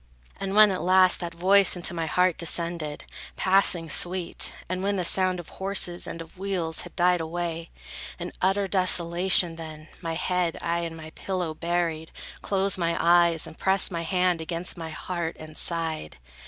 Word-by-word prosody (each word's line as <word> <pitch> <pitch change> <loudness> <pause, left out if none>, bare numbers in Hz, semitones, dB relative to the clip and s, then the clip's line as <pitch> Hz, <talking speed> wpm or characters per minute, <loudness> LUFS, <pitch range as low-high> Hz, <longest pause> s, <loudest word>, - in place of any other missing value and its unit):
And 195 0 -4
when, 210 -1 +7
at 185 - -3
last, 185 0 +4
that 170 -1 -6
voice 190 +3 +4
into 175 -1 0
my 165 -1 -3
heart 180 +1 +1
Descended, 170 -3 -2 0.3
passing 185 -3 +2
sweet, 175 +3 +2 0.2
and 185 +1 -4
when 200 +1 -1
the 180 -2 -2
sound 185 0 +3
Of 175 - -10
horses 190 -2 +1
and 165 - -6
of 165 +2 -20
wheels 180 -5 -2
had - - -11
died 180 -1 +2
away; 165 0 -5 0.5
In 175 0 -7
utter 195 +2 +1
desolation, 180 -2 +4
then, 155 -1 -10
my 165 -2 -4
head 180 -1 -1
I 170 0 -2
in 165 -1 -5
my 160 -1 -11
pillow 180 -2 -4
buried, 165 -1 -3 0.3
closed 195 -1 +1
my 170 -1 -1
eyes, 170 -1 +3
And - - -13
pressed 190 +1 +2
my 170 -1 -3
hand 180 0 0
against 170 +2 -3
my 165 -2 -7
heart, 170 +1 -5
and 155 0 -11
sighed. 160 - -2
175 Hz, 170 wpm, -25 LUFS, 165-185 Hz, 0.5 s, when